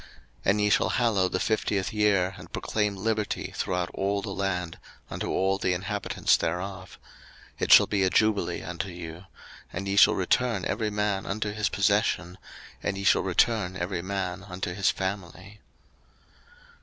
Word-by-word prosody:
03:025:010 - - -18 0.4
And 100 +2 +3
ye 105 - +3
shall - - +3
hallow 105 -7 +2
the 95 - -1
fiftieth 105 -2 0
year, 100 -3 +2
and 90 -2 -12
proclaim 105 -2 -1
liberty 105 +1 -2
throughout 90 -1 -2
all 100 +1 -1
the - - -4
land 90 -3 -2 0.3
unto - - -3
all 95 +1 +1
the 90 - +1
inhabitants 100 +3 0
thereof: 95 +2 -4 0.6
it - - 0
shall - - +9
be 100 -2 -1
a 95 - +3
jubile 110 -1 +1
unto 90 +2 -4
you; 85 0 -8 0.5
and 95 +3 -5
ye 100 - 0
shall 105 +2 +7
return 100 +2 +1
every 110 +1 -1
man 105 -2 -1
unto 105 +1 -2
his 105 -1 0
possession, 100 -3 +1 0.4
and 95 - -2
ye 100 - -4
shall - - +4
return 95 -6 +1
every 85 0 -2
man 95 -1 -3
unto 90 -2 -4
his 100 +2 +2
family. 95 +1 -5
95 Hz, 160 wpm, -27 LUFS, 90-105 Hz, 0.6 s, shall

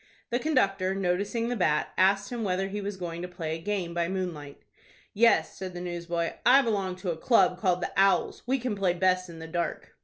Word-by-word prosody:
The 240 - +1
conductor, 195 -10 +1
noticing 200 +5 -1
the 245 - -1
bat, 155 -8 +1
asked 195 +2 +2
him 240 -2 -3
whether 190 0 -1
he 205 +1 -4
was 200 0 -4
going 170 -2 -5
to 180 - -4
play 170 -3 -5
a 165 - -8
game 190 -3 -2
by 170 0 0
moonlight. 170 -7 -5 0.5
"Yes," 230 +3 +3
said 185 -2 -7
the - - -5
newsboy. 170 -1 -3
"I 270 +3 +6
belong 200 -5 -1
to 180 -1 -3
a - - -3
club 185 -2 +3
called 185 -3 +1
'The - - -3
Owls.' 195 -2 +2
We 265 +2 +2
can 250 -4 -2
play 190 -3 +1
best 185 0 +1
in 165 - -10
the 160 0 -8
dark." 170 +1 -3
185 Hz, 215 wpm, -28 LUFS, 175-205 Hz, 0.5 s, I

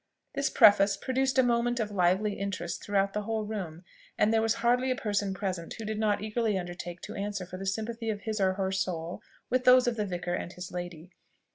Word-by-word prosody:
This 275 - 0
preface 205 -3 +6
produced 265 0 0
a 260 - +6
movement 240 0 +1
of 215 -2 -1
lively 190 +2 +2
interest 195 -4 -4
throughout 195 -1 +1
the 210 - -1
whole 220 0 -2
room, 185 -6 -5 0.3
and 220 - +3
there 225 - +4
was 225 0 +2
hardly 250 +2 +3
a 255 - +2
person 205 -5 -1
present 190 -4 -4
who 225 - -6
did 215 0 -3
not 210 -2 +1
eagerly 215 -1 0
undertake 175 -1 -6
to - - -7
answer 200 -2 -3
for 185 +1 -8
the 195 +1 -5
sympathy 225 +3 -2
of 205 -2 -2
his 215 -2 -3
or 190 -1 +3
her 190 0 -1
soul 180 -3 -2 0.3
with 255 0 +2
those 255 0 +7
of 240 -1 0
the 210 - 0
vicar 175 -1 -3
and 175 0 -3
his 180 0 -8
lady. 175 -1 -6
205 Hz, 220 wpm, -29 LUFS, 185-225 Hz, 0.3 s, those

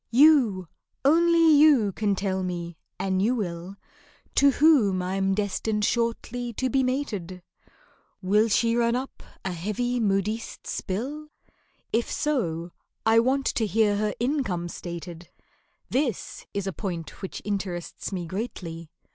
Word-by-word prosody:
You—only 300 - +4
you—can 220 - +4
tell 190 -1 -1
me, 175 -2 -4 0.2
an' 190 -1 0
you 225 +6 +2
will, 180 -3 -4 0.6
To 280 - +5
whom 270 -10 +4
I'm 195 +1 0
destined 210 +1 -1
shortly 235 +1 -1
to 260 +3 -1
be 270 - +3
mated, 210 -10 -3 0.8
Will 205 +3 +3
she 230 +2 +2
run 235 0 +2
up 260 +2 -5 0.2
a 190 - -1
heavy 215 +8 -2
modiste's 210 +1 -2
bill? 270 +11 -4 0.7
If 230 +1 +1
so, 175 - -1 0.3
I 225 0 +6
want 265 +3 +1
to 220 - 0
hear 210 -1 +2
her 210 0 -1
income 240 - -1
stated 170 -1 -8 0.6
(This 255 - -2
is 200 -1 -3
a 195 - -3
point 170 -5 -5
which 190 - -5
interests 190 -4 -4
me 180 -3 -3
greatly). 170 -4 -6
210 Hz, 125 wpm, -26 LUFS, 185-245 Hz, 0.8 s, I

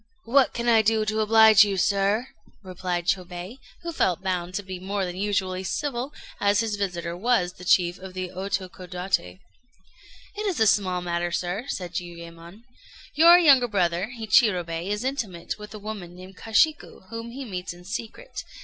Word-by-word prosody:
"What 265 +3 +3
can 235 0 -2
I 225 -2 +6
do 220 0 +1
to 215 0 -1
oblige 220 -1 +7
you, 200 -2 -1
sir?" 200 +5 +1 0.4
replied 180 -2 -3
Chôbei, 180 +5 -3 0.2
who 340 - -3
felt 190 - 0
bound 180 -1 -2
to 205 - -2
be 185 -1 -7
more 195 +1 -2
than 180 -1 -5
usually 190 -2 -1
civil, 270 +3 -3 0.3
as 205 +1 +3
his 220 -2 -2
visitor 175 -4 -3
was 190 -3 +1
the 180 - -13
chief 175 0 +3
of 185 0 -10
the 185 -1 -4
Otokodaté. 185 - -3 0.9
"It 425 +1 -4
is 365 - -1
a 220 - +5
small 185 -4 +2
matter, 175 0 -2
sir," 180 +7 -2
said 180 -9 -5
Jiuyémon. 170 +3 -8 0.5
"Your 335 +3 +8
younger 275 -8 +6
brother 185 -2 0
Hichirobei 185 -6 +2
is 210 +2 -2
intimate 220 -11 -4
with 210 0 -10
a - - -6
woman 200 -4 -7
named 185 +1 -12
Kashiku, 225 - 0
whom 230 +1 -6
he 265 +3 -7
meets 180 -5 -5
in 175 +1 -13
secret. 230 - -6
195 Hz, 165 wpm, -25 LUFS, 180-225 Hz, 0.9 s, Your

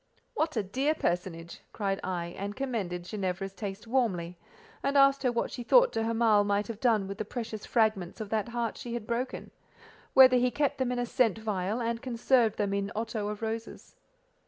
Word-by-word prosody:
"What, 315 - -1
a 215 - +1
dear 270 +10 0
personage!" 170 - -3
cried 195 -2 -1
I, 175 -2 -3
and 200 +1 -5
commended 210 -10 -3
Ginevra's 190 0 -3
taste 200 0 -6
warmly; 205 -9 0 0.5
and 280 +1 +1
asked 275 0 +5
her 255 -2 +2
what 235 - -1
she 245 - -6
thought - - +5
de 225 - -1
Hamal 225 -2 +3
might 205 0 +1
have 220 -2 -5
done 220 -6 +2
with 195 +1 -7
the - - 0
precious 220 -1 -6
fragments 215 -6 +1
of 215 -2 -6
that 220 +1 0
heart 235 -2 -2
she 240 -1 -5
had 235 -3 -5
broken—whether 255 +1 +1
he 250 0 +3
kept 285 +1 -1
them 255 -1 0
in 250 - -1
a 245 - 0
scent 235 -4 +2
vial, 210 0 -2
and 230 0 -2
conserved 240 -2 +2
them 200 -1 0
in 200 0 -1
otto 220 -1 -2
of 210 +1 -5
roses? 225 +1 -5
225 Hz, 190 wpm, -29 LUFS, 200-245 Hz, 0.5 s, asked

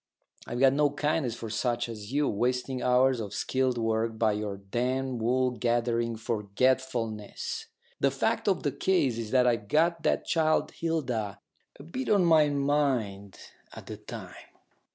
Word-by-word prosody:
I've 120 - -4
got 135 0 +5
no 145 +1 +3
kindness 145 -3 -1
for 115 -2 -7
such 120 +2 -1
as 105 -1 -8
you 145 +1 +1
wasting 125 +4 -1
hours 125 +1 +3
of 105 -2 -5
skilled 130 -1 0
work 115 0 0
by 110 -1 +3
your 105 -1 -3
damned 125 +5 -2
wool 125 +2 +2
gathering 120 -1 0
forgetfulness." 115 0 -1 0.3
"The - - +3
fact - - -1
of - - +2
the - - +1
case 140 -11 +1
is 110 -2 -4
that 125 +1 +4
I'd 115 -4 +1
got 165 +2 +2
that - - +1
child 155 -1 +1
Hilda 125 -12 -2 0.4
a - - -9
bit 255 - -5
on 200 -4 +4
my 155 -3 +5
mind 135 -9 0 0.4
at - - -10
the - - -7
time. - - -9
125 Hz, 155 wpm, -28 LUFS, 115-140 Hz, 0.4 s, got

